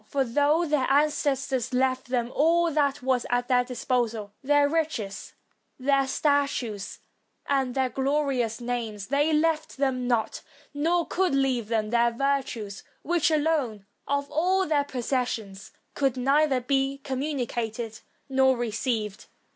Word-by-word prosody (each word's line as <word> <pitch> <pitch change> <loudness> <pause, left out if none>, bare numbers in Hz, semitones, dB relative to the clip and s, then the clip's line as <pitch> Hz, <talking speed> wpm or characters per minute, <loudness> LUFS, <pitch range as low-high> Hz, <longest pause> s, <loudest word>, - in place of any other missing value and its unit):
For 275 -1 0
though 290 +7 +2
their 295 -4 +1
ancestors 275 -3 +1
left 260 0 +1
them 245 -1 -1
all 335 +3 +3
that 285 -3 0
was 255 -2 +1
at 245 0 0
their 250 -1 +3
disposal, 235 -4 -2
their 290 +1 +3
riches, 285 -11 -2 0.4
their 275 0 +2
statues, 270 -8 0 0.5
and 270 -3 0
their 265 -1 +1
glorious 270 -5 0
names, 235 -4 -4
they 290 +3 +2
left 315 0 +1
them 260 -2 0
not, 235 -3 0 0.3
nor 330 +4 +1
could 365 -6 0
leave 260 -5 +1
them, 220 -1 -1
their 235 0 +4
virtue; 255 -4 -1 0.3
which 340 0 +2
alone, 295 -10 0 0.2
of 280 0 0
all 370 +5 +2
their 295 -3 +1
possessions, 235 -6 -3 0.2
could 270 -3 0
neither 275 +1 +2
be 270 +1 0
communicated 240 -5 -3 0.3
nor 265 -1 +3
received. 225 -2 -2
265 Hz, 130 wpm, -26 LUFS, 240-290 Hz, 0.5 s, their